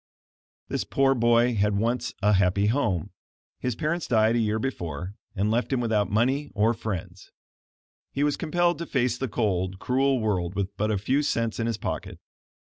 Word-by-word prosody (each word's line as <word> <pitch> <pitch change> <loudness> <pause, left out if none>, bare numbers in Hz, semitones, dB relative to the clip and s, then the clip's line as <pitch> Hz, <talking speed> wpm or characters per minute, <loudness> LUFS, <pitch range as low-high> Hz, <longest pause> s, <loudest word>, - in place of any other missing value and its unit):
"] - - -87
This - - -2
poor 135 0 +2
boy 120 0 +3
had 105 -1 +1
once 120 +3 0
a 105 +1 +4
happy 100 +1 +3
home. 105 - 0 0.5
His 125 -3 -2
parents 155 +7 -2
died 110 -1 +3
a - - +2
year 110 -1 +1
before, 90 - -4 0.2
and 100 +3 +1
left 120 +4 0
him 130 - +1
without 110 -4 +1
money 130 +7 +1
or 110 +3 +3
friends. 110 -6 -6 0.8
He 140 - -1
was 145 -1 +2
compelled 175 +1 +1
to 170 - -4
face 125 -2 0
the 135 - -1
cold, 95 -5 -1
cruel 135 +5 +1
world 95 -5 -1
with 100 +1 -2
but 105 +2 -1
a 105 - +1
few 130 +9 +1
cents 115 -6 -1
in 115 - 0
his 115 -3 -1
pocket. - - -4
115 Hz, 185 wpm, -26 LUFS, 100-130 Hz, 0.8 s, a